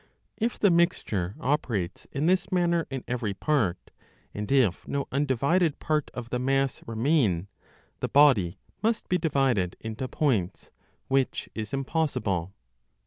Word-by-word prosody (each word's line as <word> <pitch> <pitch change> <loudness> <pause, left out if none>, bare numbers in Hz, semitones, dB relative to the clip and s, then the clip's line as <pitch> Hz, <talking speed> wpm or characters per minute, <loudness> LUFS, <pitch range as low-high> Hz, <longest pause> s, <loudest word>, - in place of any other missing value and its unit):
If 230 +2 -1
the 200 - +4
mixture 110 - +1
operates 120 -10 -1
in 145 +2 -1
this 185 +2 +2
manner 170 -2 +2
in 135 -2 -5
every 115 -5 -2
part, 110 - 0 0.4
and 105 +2 -4
if 125 -10 +2
no 140 -1 -2
undivided 145 +5 +1
part 155 -1 -1
of 120 -1 -6
the 125 - 0
mass 135 0 0
remain, 115 - +1 0.5
the - - -2
body 130 -12 +5 0.2
must 225 0 0
be 180 - +2
divided 135 - +1
into 110 +3 -5
points, 115 - -1 0.4
which 135 -1 0
is 110 -2 -5
impossible. 130 - -1
135 Hz, 135 wpm, -27 LUFS, 110-155 Hz, 0.5 s, body